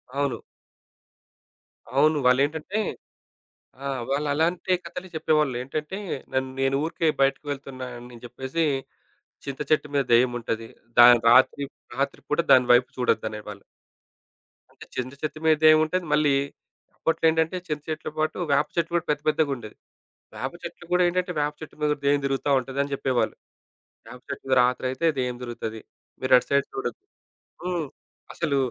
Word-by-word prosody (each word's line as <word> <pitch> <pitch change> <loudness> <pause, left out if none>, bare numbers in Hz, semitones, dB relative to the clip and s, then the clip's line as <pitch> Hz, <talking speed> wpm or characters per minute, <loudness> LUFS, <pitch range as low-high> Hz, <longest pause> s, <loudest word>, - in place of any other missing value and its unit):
అవును. 140 -2 0 1.6
అవును. 150 +2 +4
వాళ్ళేంటంటే 150 +10 +1 1.0
ఆ! - - -5 0.2
వాళ్ళు 145 +2 0
అలాంటి 170 +4 +1
కథలే 175 +2 -7
చెప్పేవాళ్ళు. 155 -4 +2
ఏంటంటే 150 +6 -4 0.2
ఆహ్, - - -12
నన్ 130 0 +1
నేను 135 0 +2
ఊరికే 165 0 -1
బయటకి 135 +2 +2
వెళ్తున్నాను 130 -3 -6 0.2
అని 120 - -12
జెప్పేసి, 130 +7 -3 0.8
చింత 140 -1 -5
చెట్టు 150 -1 +3
మీద 140 - +3
దెయ్యముంటది. 115 -2 +1 0.3
దా 120 - +11 0.2
రాత్రి 130 +3 +5 0.3
రాత్రిపూట 140 +2 -2
దాని 125 -1 +7
వైపు 125 +1 +4
చూడొద్దు 125 -3 +1
అనేవాళ్ళు. 105 -2 -8 1.1
అంటే - - -13
చింద 130 0 -3
చెట్టు 155 0 -4
మీద 160 -1 +6
దెయ్యం 155 0 +8
ఉంటది 180 +2 -2
మళ్ళీ, 150 -2 +4 0.6
అప్పట్లో 165 0 0
ఏంటంటే 160 +3 +1
చింత 150 -2 -3
చెట్లు 155 -1 -4
పాటు, 155 0 0
వేప 145 +2 +3
చెట్లు 170 0 -1
కూడా 170 0 +1
పెద్ద 150 -1 +1
పెద్దగా 155 -1 +1
ఉండేది. 110 -3 -10 0.6
వేప - - -4
చెట్లు - - -8
కూడా 180 - +4
ఏంటంటే 180 +1 -1
వేప 145 0 0
చెట్టు 155 - -10
మీద 150 0 +3
దెయ్యం 140 0 +3
దిరుగుతా 135 +1 -1
ఉంటది 130 +2 -7
అని 140 - -4
జెప్పేవాళ్ళు. 130 -2 0 0.7
వేపచెట్టు 125 +3 -8
మీద 130 - +3
రాత్రి 125 +1 +1
అయితే 130 +6 -1
దెయ్యం 125 -1 -1
దిరుగుతది 115 -2 -5 0.4
మీరు 130 0 -1
అటు 125 - +2
సైడ్ 140 0 +3
చూడొద్దు. 405 0 -4 0.6
హ్మ్ 175 -3 -2 0.5
అసలు 150 -5 0
140 Hz, 145 wpm, -25 LUFS, 130-155 Hz, 1.6 s, దా